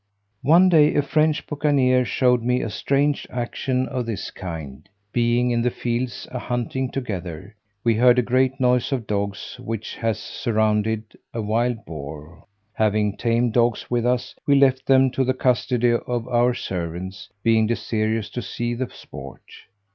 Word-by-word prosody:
One 170 +7 +6
day 155 -4 +5
a 145 - +3
French 155 +2 +1
buccaneer 135 -4 +2
showed 125 0 +2
me 125 +2 +1
a 110 - -3
strange 140 +6 0
action 125 +1 -2
of 125 -3 -3
this 110 -4 -4
kind: 80 -6 -8 0.2
being 120 +1 +2
in 120 0 +1
the 125 - +2
fields 120 +1 -3
a 125 - -4
hunting 125 +2 -2
together, 95 - -5 0.3
we 115 - +3
heard 125 +2 +5
a 125 - +4
great 130 +2 +1
noise 125 +1 +2
of 125 -5 -1
dogs 100 +3 -3
which 115 -3 -5
has 115 -1 0
surrounded 110 -1 0 0.3
a 115 - -1
wild 115 +2 0
boar: 75 +1 -9 0.3
having 105 -1 +1
tame 120 +1 +1
dogs 120 0 +1
with 120 -1 +1
us, 125 0 0
we 140 - +5
left 135 -1 +3
them 135 -1 +5
to 135 - 0
the 130 0 0
custody 125 -1 +2
of 120 0 -2
our 120 0 +2
servants, 95 +1 -5
being 110 -1 +3
desirous 110 -1 -1
to 125 - -4
see 120 0 -3
the 125 +1 -3
sport. - - -11
120 Hz, 160 wpm, -23 LUFS, 110-130 Hz, 0.3 s, One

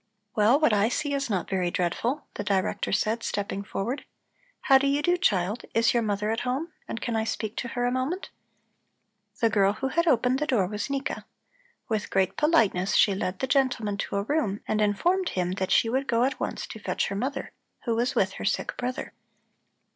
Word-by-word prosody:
"Well, 225 +6 +5
what 305 -8 +4
I 210 +2 +3
see 290 +3 -1
is 280 -2 -1
not 190 -5 -1
very 185 -2 0
dreadful," 205 - -1
the - - -4
Director 195 -2 0
said, 220 +3 +1
stepping 200 -2 -3
forward. 235 +8 -3 0.6
"How 270 -1 +6
do 275 - +1
you 285 +1 +1
do, 350 +3 +3
child. 210 - +1
Is 230 0 +4
your 240 - +3
mother 210 0 -1
at 225 - -1
home, 275 +7 -2
and 225 - -4
can 235 - -2
I 220 - +1
speak 220 -1 -3
to 240 - -2
her 245 +1 -2
a 245 - +1
moment?" 260 +9 -2 1.1
The 230 - +4
girl 200 -2 +3
who 265 +5 -3
had 335 +5 +1
opened 255 -2 +3
the 300 - -1
door 235 -10 +2
was 210 +7 -4
Nika. 275 0 -3 0.6
With 215 -3 -2
great 190 -1 +1
politeness 220 - +2
she 200 - +5
led 190 -1 -2
the 265 - -1
gentleman 250 -6 +1
to 200 - -3
a 200 - +1
room 215 -6 -1
and 215 0 +1
informed 350 - +2
him 180 -1 -1
that 190 0 -2
she - - +4
would 265 +4 0
go 235 0 +2
at 260 0 0
once - - -3
to 220 - -9
fetch - - -1
her 200 - -3
mother, 270 +6 -3 0.3
who 235 - +1
was 240 +3 0
with - - +2
her - - -6
sick - - -1
brother. 250 +1 -4
230 Hz, 205 wpm, -27 LUFS, 205-270 Hz, 1.1 s, How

